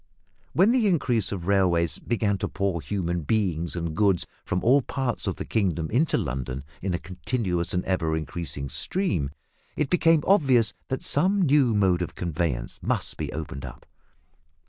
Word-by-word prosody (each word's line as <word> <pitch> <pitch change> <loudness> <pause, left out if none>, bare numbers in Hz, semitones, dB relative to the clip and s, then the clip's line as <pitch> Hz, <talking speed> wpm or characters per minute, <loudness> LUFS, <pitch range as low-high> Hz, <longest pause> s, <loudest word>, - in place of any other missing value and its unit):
When 195 +6 +5
the 245 -4 +3
increase 125 - +1
of 90 -4 -4
railways 90 -4 +2
began 105 -4 0
to - - -1
pour 100 -4 -1
human 85 +2 -2
beings 85 -2 -1
and 85 -2 -3
goods 95 -3 +2 0.2
from 90 - -2
all 135 +5 +5
parts 130 -4 -2
of 95 - -1
the - - -6
kingdom 90 -7 -1
into 140 +7 +2
London 65 +1 -3 0.2
in 95 -1 -1
a - - 0
continuous 90 -1 -2
and 90 - -1
ever 80 -4 0
increasing 80 -3 -5
stream, 165 - -1 0.5
it 150 -3 -1
became 165 -3 +4
obvious 135 - +4
that 130 - -3
some 190 +6 +3
new 140 -7 +4
mode 95 -3 +3
of 90 - -4
conveyance 80 -8 -2
must - - 0
be - - -4
opened 75 -3 -6
up. 65 -3 -9
95 Hz, 165 wpm, -26 LUFS, 85-130 Hz, 0.5 s, When